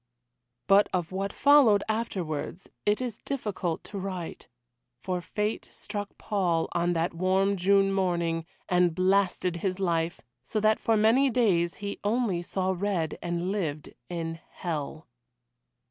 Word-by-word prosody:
But 200 +1 +5
of 175 -2 -1
what 195 +1 -2
followed 270 -8 +5
afterwards 185 -7 -3 0.2
it 210 +4 +3
is 245 -4 -4
difficult 205 -11 -3
to 200 - -6
write. 185 -3 -5 0.5
For 180 +8 -3
fate 210 +4 -3
struck 205 -1 -6
Paul 180 -6 0
on 175 0 +1
that 165 +1 0
warm 190 +3 +2
June 195 +1 +3
morning, 170 -3 0 0.2
and 180 -2 +3
blasted 185 -1 +2
his 185 +2 -2
life, 170 -3 0 0.2
so 215 - -2
that 215 +1 +3
for 225 -1 +2
many 230 +6 +4
days 190 -9 +2
he 200 0 -5
only 205 -4 +1
saw 190 +1 -1
red, 180 -4 -1
and 175 +1 -2
lived 155 -8 -3 0.2
in 165 -1 -4
hell. 155 -2 -5
185 Hz, 135 wpm, -28 LUFS, 170-205 Hz, 0.5 s, But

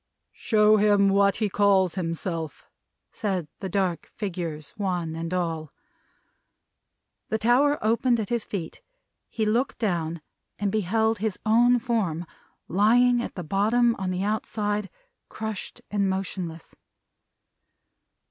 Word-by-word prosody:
"Show 215 -1 +4
him 205 -1 +4
what 200 0 +4
he 215 - 0
calls 195 -3 +3
himself," 165 -2 -3 0.5
said 190 -7 -2
the 190 - -4
dark 185 -3 -1
figures, 170 -7 -5
one 180 -5 -2
and 165 +1 -4
all. 165 -4 -2 1.6
The 220 - +1
tower 260 +6 +3
opened 235 +2 +2
at 210 - -3
his 235 -2 0
feet. 175 -6 -6 0.5
He 220 - -1
looked 235 +5 0
down, 170 -7 -1 0.4
and 205 -1 -1
beheld 220 +2 +1
his 215 -2 -1
own 240 +3 +5
form, 215 -9 -1 0.4
lying 240 +6 +4
at - - -6
the 180 - -5
bottom, 220 +8 +2
on 190 -1 -2
the 185 +1 -1
outside: 210 -1 -1 0.4
crushed 220 -3 -6
and 200 -2 +1
motionless. 185 -3 -4
200 Hz, 120 wpm, -26 LUFS, 180-220 Hz, 1.6 s, own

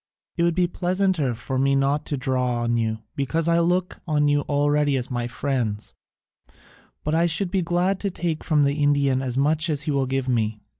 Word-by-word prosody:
It - - -1
would 170 -1 +2
be 180 -1 +3
pleasanter 180 -6 0
for 130 +3 -3
me 135 +1 +3
not 140 +2 +1
to 145 - -1
draw 125 -2 0
on 120 0 +1
you, 110 -1 -1
because 160 +4 -1
I 170 0 +3
look 180 +2 0
on 150 -2 +2
you 145 0 +3
already 145 -1 +2
as 125 +1 -4
my 120 -1 -2
friends, 120 -5 -2 1.1
but 150 - -1
I 165 +1 +3
should 175 +2 -2
be 190 -1 +1
glad 180 +3 0
to 200 - -1
take 170 -3 -3
from 150 -3 +2
the 140 +2 0
Indian 140 -2 +2
as 130 -1 -3
much 155 +4 +2
as 150 -2 -1
he 150 - -1
will 135 -2 0
give 135 0 -1
me. 110 -3 0
145 Hz, 205 wpm, -24 LUFS, 130-170 Hz, 1.1 s, be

